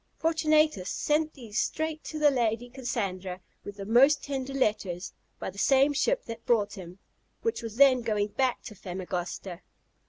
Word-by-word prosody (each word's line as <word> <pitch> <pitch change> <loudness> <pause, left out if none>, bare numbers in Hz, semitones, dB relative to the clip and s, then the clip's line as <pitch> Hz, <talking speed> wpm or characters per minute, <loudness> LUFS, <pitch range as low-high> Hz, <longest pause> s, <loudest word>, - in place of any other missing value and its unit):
Fortunatus 310 - +2
sent 310 +1 0
these 230 -5 -4
straight 315 0 -2
to 310 - -5
the 300 -1 +5
Lady 240 -1 0
Cassandra, 195 -8 -3 0.2
with 205 - -8
the 200 - -6
most 270 +7 +5
tender 275 -1 -3
letters, 210 -9 -1 0.2
by - - -5
the 200 - -10
same 275 +4 +4
ship - - +1
that 230 0 -7
brought 210 -5 +2
him, 180 -1 -9 0.5
which 455 - -1
was 225 -2 -6
then 260 -1 +6
going 210 -2 0
back 255 +3 0
to 215 - -8
Famagosta. 180 -1 -5
235 Hz, 160 wpm, -28 LUFS, 200-280 Hz, 0.5 s, then